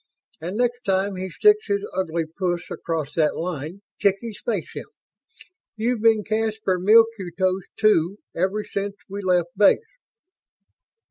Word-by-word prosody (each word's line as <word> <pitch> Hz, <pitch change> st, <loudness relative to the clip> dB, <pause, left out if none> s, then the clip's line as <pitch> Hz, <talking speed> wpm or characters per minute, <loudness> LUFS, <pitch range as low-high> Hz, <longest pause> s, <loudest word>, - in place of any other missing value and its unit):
And 180 Hz, +5 st, -4 dB
next 245 Hz, 0 st, 0 dB
time 195 Hz, -1 st, 0 dB
he 185 Hz, +1 st, -4 dB
sticks 425 Hz, -, +3 dB
his 405 Hz, 0 st, 0 dB
ugly 165 Hz, -3 st, -1 dB
puss 175 Hz, +1 st, -3 dB
across 155 Hz, -3 st, -3 dB
that 155 Hz, -2 st, +1 dB
line, 170 Hz, +2 st, -5 dB, 0.2 s
kick 200 Hz, -1 st, +3 dB
his 230 Hz, -3 st, -8 dB
face 485 Hz, -, -2 dB
in. -, -, -5 dB, 0.9 s
You've 230 Hz, +1 st, 0 dB
been 220 Hz, -2 st, +4 dB
Caspar 220 Hz, -3 st, -1 dB
Milquetoast 190 Hz, -3 st, +3 dB
Two 200 Hz, -3 st, +3 dB, 0.2 s
ever 190 Hz, +5 st, 0 dB
since 200 Hz, 0 st, -4 dB
we 200 Hz, +1 st, -6 dB
left 180 Hz, -2 st, +1 dB
Base." 205 Hz, 0 st, +6 dB
195 Hz, 135 wpm, -23 LUFS, 175-220 Hz, 0.9 s, Base